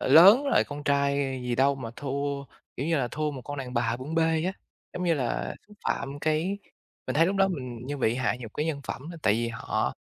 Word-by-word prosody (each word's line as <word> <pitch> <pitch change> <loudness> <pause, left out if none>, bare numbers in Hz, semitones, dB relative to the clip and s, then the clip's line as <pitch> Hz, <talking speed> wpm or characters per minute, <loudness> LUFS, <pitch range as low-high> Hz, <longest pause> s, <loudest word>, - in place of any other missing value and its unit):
lớn 190 - +8
rồi, 280 - +4
con 145 0 -7
trai 140 -1 +2 0.3
gì 125 -1 -1
đâu 135 +3 +4
mà 120 -4 -6
thua, 140 0 -2 0.3
kiểu 140 - -2
như 165 - +2
là, 125 -3 0
thua 155 +4 -1
một 135 -3 -7
con 145 +2 -6
đàn 130 -2 -5
bà 120 -1 +1
bưng 135 +6 -6
bê" 160 0 +2
á, 185 - 0 0.4
giống 180 - -3
như 170 - +3
là, 130 -5 -2
xúc 210 - -16
phạm 140 +1 -2
cái 160 +6 0 0.5
mình - - -2
thấy 165 +2 +6
lúc 195 +2 0
đó 195 0 +4
mình 130 -9 -4
như 145 - -3
bị 120 -4 +2
hạ 125 0 +1
nhục 115 -3 -8
cái 150 - -1
nhân 150 -3 -2
phẩm 150 +5 -5
đó. 170 - -8
Tại 105 - +4
vì 115 +1 0
họ 115 -1 -1
140 Hz, 245 wpm, -27 LUFS, 130-160 Hz, 0.5 s, lớn